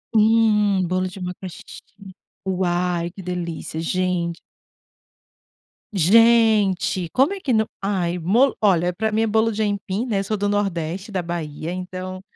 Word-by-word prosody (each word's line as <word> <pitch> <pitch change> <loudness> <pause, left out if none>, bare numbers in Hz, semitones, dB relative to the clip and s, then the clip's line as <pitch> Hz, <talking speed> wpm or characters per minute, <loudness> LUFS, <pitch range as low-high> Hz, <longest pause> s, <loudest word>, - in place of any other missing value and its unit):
Hum, 210 -4 +3
bolo 185 +1 0
de 185 +1 -9
macaxe 180 0 -7 0.8
uau, 175 -2 0
que 195 - -9
delícia 170 -3 -5
gente. 175 -1 -1 1.5
Gente, 205 -2 +4
como 270 +8 +3
é 395 - -6
que 265 -8 -1
nao, 220 0 +3 0.2
ai 180 -3 -1
bolo 230 +11 +3
olha 180 -4 +3
para 220 +4 -1
mim 215 +1 0
é 225 - +2
bolo 220 +1 +2
de 220 - -2
aipim, 205 +2 -1
né, 205 -5 0
sou 215 +2 -2
do 205 0 -1
nordeste, 195 0 -2
da 185 - 0
Bahia, 165 -1 -5
então 185 +1 -6
190 Hz, 140 wpm, -22 LUFS, 180-215 Hz, 1.5 s, Gente